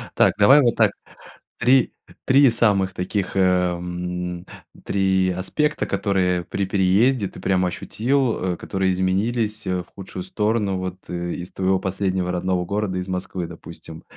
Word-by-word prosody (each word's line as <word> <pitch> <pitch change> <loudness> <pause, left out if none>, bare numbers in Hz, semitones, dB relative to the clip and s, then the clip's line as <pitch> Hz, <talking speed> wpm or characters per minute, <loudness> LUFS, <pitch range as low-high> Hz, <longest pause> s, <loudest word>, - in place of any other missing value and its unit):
Так. - - +4
Давай 135 +8 +7
вот 120 -3 +2
так. - - +4 0.7
3 130 0 +3 0.3
3 135 -1 +5
самых 100 -5 +2
таких, 95 +1 -3
э, - - +3
м, 90 -1 -1 0.4
3 95 -1 +1
аспекта, 95 - -1
которые 90 -3 0
при 100 +3 -3
переезде 100 +5 +2
ты - - -12
прямо 95 -1 +1
ощутил, 115 -3 -1
э, - - -7
которые 95 -1 -1
изменились, 105 +4 -1
э, 90 -1 0
в - - -27
худшую 95 -1 -7
сторону 105 0 0
вот, 95 0 -4
э, 85 0 -4
из 90 +1 -8
твоего 95 0 +1
последнего 95 -1 -1
родного 90 0 -1
города, 100 0 -2
из 90 0 -4
Москвы, 90 -1 -4
допустим. 80 0 -11
95 Hz, 150 wpm, -22 LUFS, 90-105 Hz, 0.7 s, Давай